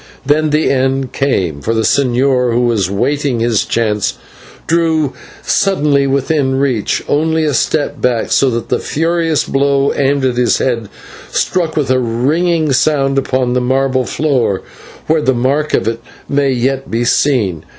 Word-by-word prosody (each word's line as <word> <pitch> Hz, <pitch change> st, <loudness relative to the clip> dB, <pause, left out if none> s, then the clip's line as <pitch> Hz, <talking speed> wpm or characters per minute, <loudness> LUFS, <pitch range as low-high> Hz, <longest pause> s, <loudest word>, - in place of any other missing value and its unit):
Then 155 Hz, +2 st, +2 dB
the 150 Hz, +1 st, +1 dB
end 135 Hz, -1 st, 0 dB
came, 90 Hz, -, -1 dB
for 115 Hz, +7 st, -1 dB
the 110 Hz, -, +1 dB
señor, 125 Hz, 0 st, +2 dB
who 120 Hz, -, +2 dB
was 115 Hz, -6 st, +1 dB
waiting 130 Hz, +5 st, -1 dB
his 115 Hz, -2 st, +1 dB
chance, 105 Hz, -3 st, -1 dB, 0.5 s
drew 160 Hz, -4 st, +1 dB, 0.3 s
suddenly 145 Hz, -8 st, +1 dB
within 135 Hz, 0 st, 0 dB
reach, 130 Hz, -6 st, 0 dB
only 160 Hz, +2 st, +1 dB
to 150 Hz, -2 st, 0 dB
step 150 Hz, +2 st, -1 dB
back 120 Hz, -3 st, 0 dB
so 135 Hz, -, +3 dB
that 115 Hz, -2 st, -4 dB
the -, -, +1 dB
furious 165 Hz, 0 st, 0 dB
blow 140 Hz, 0 st, +1 dB
aimed 140 Hz, 0 st, +1 dB
at 125 Hz, -2 st, 0 dB
his 125 Hz, -1 st, +2 dB
head 115 Hz, -5 st, -2 dB, 0.4 s
struck 170 Hz, -4 st, -1 dB
with 140 Hz, -4 st, 0 dB
a 130 Hz, -, +3 dB
ringing 150 Hz, +7 st, 0 dB
sound 135 Hz, -1 st, +2 dB
upon 130 Hz, -2 st, -1 dB
the 125 Hz, -, +1 dB
marble 130 Hz, +1 st, +1 dB
floor, 130 Hz, -10 st, 0 dB, 0.4 s
where 160 Hz, 0 st, +1 dB
the 130 Hz, -3 st, +1 dB
mark 140 Hz, +5 st, 0 dB
of -, -, -1 dB
it 115 Hz, 0 st, -1 dB, 0.3 s
may 140 Hz, -1 st, +1 dB
yet 135 Hz, +1 st, -1 dB
be 115 Hz, +2 st, -1 dB
seen. 110 Hz, -, +1 dB
135 Hz, 160 wpm, -14 LUFS, 120-145 Hz, 0.5 s, so